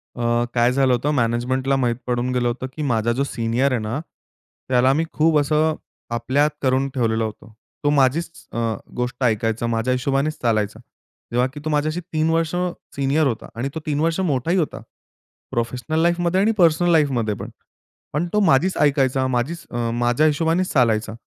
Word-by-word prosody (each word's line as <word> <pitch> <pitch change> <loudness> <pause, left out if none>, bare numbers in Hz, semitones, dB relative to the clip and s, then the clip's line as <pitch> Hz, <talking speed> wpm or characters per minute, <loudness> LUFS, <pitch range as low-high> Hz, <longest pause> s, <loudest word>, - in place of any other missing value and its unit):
अ, 120 0 +1
काय 120 0 +3
झालं 130 -1 +3
होतं. 140 +5 0
मॅनेजमेंटला 130 +1 0
माहीत 125 -3 +1
पडून 125 0 0
गेलं 120 -1 +1
होतं 125 +2 -3
की 155 - -5
माझा 115 +1 +1
जो 135 +4 0
सीनियर 120 +1 0
आहे 125 - +1
ना, 110 +6 -3 0.7
त्याला 130 +1 +4
मी 155 +4 +1
खूप 155 0 +3
असं 155 +2 +2 0.4
आपल्यात 130 +6 +2
करून 130 0 +2
ठेवलेलं 115 -3 +1
होतं. 110 +1 -7 0.3
तो 145 - +3
माझीच 145 +3 +2 0.2
अ, - - -4 0.4
गोष्ट 125 +1 -3
ऐकायचा, 115 0 0
माझ्या 115 +2 0
हिशोबानेच 135 +4 0
चालायचा. 110 -2 0 0.5
जेव्हा 125 +2 +2
की 150 - -7
तो - - -1
माझ्याशी 155 +3 0
3 155 0 +1
वर्ष 165 +1 0 0.4
सीनियर 140 +2 +2
होता, 115 -4 -3
आणि 125 +4 -2
तो - - -2
3 150 -1 -1
वर्ष 165 +2 +1
मोठाही 165 0 0
होता 165 -5 -1 0.7
प्रोफेशनल 125 +7 -2
लाईफमध्ये 175 +1 +2
आणि 215 +3 +3
पर्सनल 175 -1 +4
लाईफमध्ये 130 -9 +2
पण. - - -7 0.6
पण 155 +5 0
तो 210 - +3
माझीच 180 -1 +3
ऐकायचा, 135 -2 +2
माझीच 130 +7 -2
अ 120 -1 -1
माझ्या 120 +5 +2
हिशोबानेच 165 +4 +1
चालायचा. 110 -4 +2
130 Hz, 170 wpm, -22 LUFS, 120-155 Hz, 0.7 s, त्याला